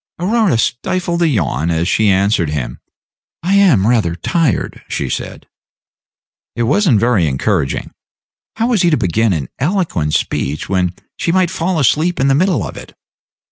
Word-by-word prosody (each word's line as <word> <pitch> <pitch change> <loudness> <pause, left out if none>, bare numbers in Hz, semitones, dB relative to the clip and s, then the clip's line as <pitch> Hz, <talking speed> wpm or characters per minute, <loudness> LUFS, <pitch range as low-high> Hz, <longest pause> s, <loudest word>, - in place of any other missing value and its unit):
Aurora 200 - +1
stifled 175 +9 -1
a 170 - +4
yawn 85 - 0
as 85 +1 0
she 110 +1 +2
answered 95 -3 +2
him. 65 -5 -4 0.6
"I 185 +3 0
am 180 - +4
rather 110 -8 +1
tired," 150 - -1
she - - -3
said. - - -5 1.1
It 120 - -1
was 190 - +2
n't 115 -7 +4
very 110 -7 +2
encouraging. 75 +2 -1 0.6
How 230 +2 0
was 225 -7 +2
he 175 - +3
to 155 - +2
begin 110 +1 +1
an 75 -8 -2
eloquent 145 - 0
speech, 70 +3 -2
when 90 -2 0 0.2
she 170 - -1
might 185 -1 +2
fall 170 +1 -1
asleep 155 +6 +1
in 135 +1 +2
the - - +4
middle 165 - +1
of - - -9
it? - - -11
120 Hz, 165 wpm, -16 LUFS, -, 1.1 s, a